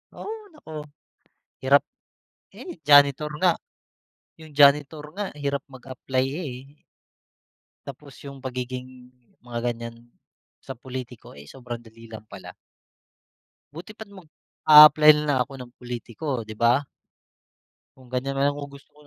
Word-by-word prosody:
Oo, 420 - -7 0.2
naku, 305 - -15 0.9
hirap, 140 +2 +5 0.7
eh, 350 - -10
janitor 145 +1 +5
nga, 185 -1 +5 0.9
yung 160 -1 -13
janitor 145 +1 +4
nga, 205 +2 -4 0.2
hirap 140 0 -1
mag-apply 130 0 -3 0.2
eh. 135 +2 -10 1.0
Tapos 140 0 -11
yung 140 -1 -9
pagiging, 125 0 -7 0.3
mga 120 0 -3
ganyan, 115 0 -11 0.5
sa 135 - -7
pulitiko 125 - -9
eh, 70 - -12
sobrang 120 - -8
dali 115 0 -16
lang 110 -1 -10
pala. - - -11 1.2
Buti 170 +7 -10
pa't 220 - -8
mag-aapply 155 -3 +6
nalang 150 -2 0
ako 140 - -15
ng 125 -1 -10
pulitiko 120 +2 -8 0.2
'di 110 - -8
ba? 120 +4 +3 1.2
Kung 130 -1 -18
ganyan 135 +2 -2
na 135 - +2
lang 145 - +2
kung 145 0 -8
gusto 140 0 -17
130 Hz, 125 wpm, -24 LUFS, 125-145 Hz, 1.2 s, mag-aapply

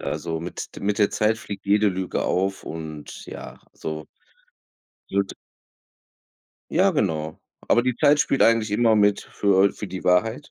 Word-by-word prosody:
also, 80 +3 -3
mit 85 +1 -7
de - - -9
mit 105 +2 0
der 105 - +3
Zeit 110 +1 +1
fliegt 100 -2 -8
jede 105 +1 +4
Lüge 95 -1 -2
auf 95 +1 -1
und 80 -2 -8
ja, - - -9
also 75 0 -6 1.0
wird 100 0 -1 1.4
Ja 190 +4 +4
genau. 80 - -1 0.3
Aber 120 - +4
die 125 -1 0
Zeit 145 -1 +4
spielt 135 - +2
eigentlich 115 -2 +3
immer 110 0 +4
mit 105 -1 +3
für 100 -1 +2
für 105 - -7
die 95 0 -7
Wahrheit 110 +10 +1
100 Hz, 155 wpm, -24 LUFS, 90-110 Hz, 1.4 s, jede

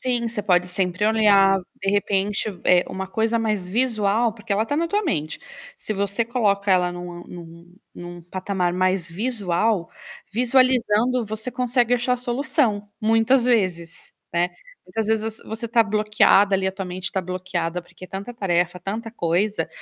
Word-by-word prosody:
Sim, 240 -2 0
você 220 -2 -4
pode 180 -3 +2
sempre 180 +1 -1
olhar, 200 -3 +4 0.2
de 195 - +1
repente, 200 0 0 0.2
eh, 180 0 +5
uma 190 0 -5
coisa 225 +3 0
mais 210 -5 -1
visual, 225 0 +1
porque 215 -1 -4
ela 210 +2 +1
tá 290 +6 -2
na 335 - 0
tua 410 +4 0
mente. 155 - -2 0.4
Se 220 - -6
você 200 +2 -1
coloca 210 -4 0
ela 180 -1 +3
numa 175 0 -8
num 170 +1 -12 0.2
num 175 0 -9
patamar 185 +1 -2
mais 185 -1 0
visual, 205 -2 0 0.4
visualizando, 245 0 +2
você 220 +3 -5
consegue 245 0 +1
achar 245 +1 0
a - - -2
solução 250 -2 0 0.2
muitas 225 +3 +3
vezes, 185 -9 -1 0.2
né? 175 +1 +1 0.4
Muitas 215 +4 -3
vezes 220 -1 +1
você 225 0 -6
você 225 +2 -5
tá 230 +1 +4
bloqueada 210 -2 +3
ali, 190 0 0
a - - -1
tua 195 0 -6
mente 180 0 -4
tá 190 - -1
bloqueada, 180 -1 -3
porque 185 - -13
é - - -18
tanta 195 +6 -6
tarefa, 180 -3 0
tanta 215 +5 -4
coisa, 200 +1 -1
205 Hz, 165 wpm, -23 LUFS, 180-230 Hz, 0.4 s, eh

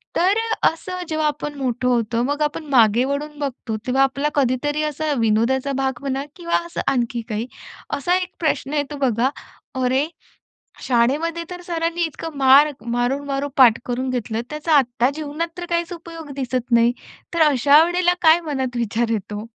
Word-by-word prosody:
तर 380 +4 +3 0.3
अ, - - +7
असं 365 +2 -7
जेव्हा 310 -1 0
आपण 295 0 -3
मोठं 250 -1 -1
होतो. 235 -2 +1
मग 290 +4 -2
आपण 300 +1 -1
मागे 235 -2 +5
वळून 295 +2 -3
बघतो 255 -6 -4
तेव्हा 265 +2 +3
आपला 275 +2 0
कधीतरी 290 +3 +1
असा 305 +1 -3
विनोदाचा 230 +5 +1
भाग 265 -2 -1
म्हणा 275 0 -2
किंवा 340 -1 0
असं 340 - -4
आणखी 240 -2 -1
काही. 220 +2 -3 0.5
असा 350 +6 +1
1 365 -1 -3
प्रश्न 295 -3 -1
येतो 290 0 -2
बघा, 255 -2 +1 0.5
"अरे, 260 +4 +2 0.7
शाळेमध्ये 290 +8 +1
तर 355 -1 -7
सरांनी 335 -1 -2
इतकं 320 -1 -5
मार 275 +3 +6
मारून-मारून 275 +4 -1
पाठ 245 -4 +7
करून 255 +1 -2
घेतलं, 230 -3 -2
त्याचा 305 +2 -1
आत्ता 245 -2 +2
जीवनात 310 +2 -3
तर 355 - -5
काहीच 340 0 -1
उपयोग 330 -3 -9
दिसत 255 -2 -3
नाही." 235 0 +5 0.4
तर 335 - +1
अशा 285 +2 +5
वेळेला 350 +1 +2
काय 320 0 +6
मनात 265 -4 -2
विचार 235 0 0
येतो? 210 0 -3
275 Hz, 160 wpm, -21 LUFS, 245-310 Hz, 0.7 s, अ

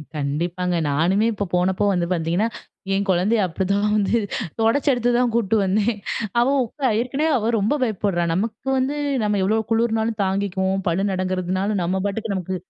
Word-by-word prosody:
கண்டிப்பாங்க. 170 +5 -2
நானுமே 175 +9 +2
இப்ப 200 -2 -3
போனப்போ 185 +3 +1
வந்து 175 -2 0
பார்த்தீங்கன்னா, 175 +6 0 0.5
என் 200 +1 0
குழந்தைய 190 +5 +2
அப்பிடி 185 +3 -3
தான் 210 +1 +1
வந்து 205 +2 +1 0.4
துடச்சு 230 +6 +2
எடுத்து 245 -1 0
தான் 245 -1 +2
கூட்டு 225 -2 +1
வந்தேன். 210 +3 +1 0.4
அவ 240 - +3 0.2
உக்கா 265 +3 -3
ஏற்கனவே 275 +6 0
அவ 225 +1 0
ரொம்ப 210 +8 +1
பயப்புட்றா! 200 -6 0
நமக்கு 220 +7 -3
வந்து 265 +3 0 0.3
நம்ம 210 -1 +1
எவ்ளோ 215 +4 +2
குளிர்னாலும் 225 -1 +1
தாங்கிக்குவோம். 190 0 -1
பல்லு 185 +4 0
நடுங்கிறதுனாலும் 185 +1 -1
நம்ம 190 +2 -1
பாட்டுக்கு 205 +1 -2
நமக்கு 185 0 -3
200 Hz, 155 wpm, -22 LUFS, 185-225 Hz, 0.5 s, அவ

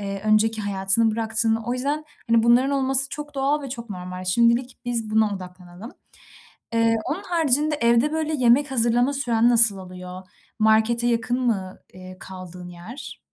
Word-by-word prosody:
eee, 195 -1 -5
önceki 215 +1 +2
hayatını 200 +3 +1
bıraktın. 225 0 0
O 240 - -1
yüzden, 290 +4 -2 0.3
hani, 230 -1 +4
bunların 245 +4 +4
olması 270 -1 0
çok 295 -1 -8
doğal 280 +2 0
ve 275 - -6
çok 235 -3 -7
normal. 185 0 -7
Şimdilik 235 +6 +1
biz 230 -3 -3
buna 215 -1 +2
odaklanalım. 180 +3 -11 0.8
Eee, 230 0 +2
onun 375 +7 -3
haricinde, 305 -4 +1
evde, 235 +5 +3
böyle, 315 0 -2
yemek 265 +2 +3
hazırlama 245 +2 +2
süren 240 -4 +2
nasıl 230 -4 +4
oluyor? 180 0 -9 0.4
Markete 220 +2 +3
yakın 240 +2 0
mı, 195 -6 -2
eee, 185 0 -11
kaldığın 180 -1 -10
yer? 220 +11 -10
230 Hz, 155 wpm, -23 LUFS, 195-260 Hz, 0.8 s, hani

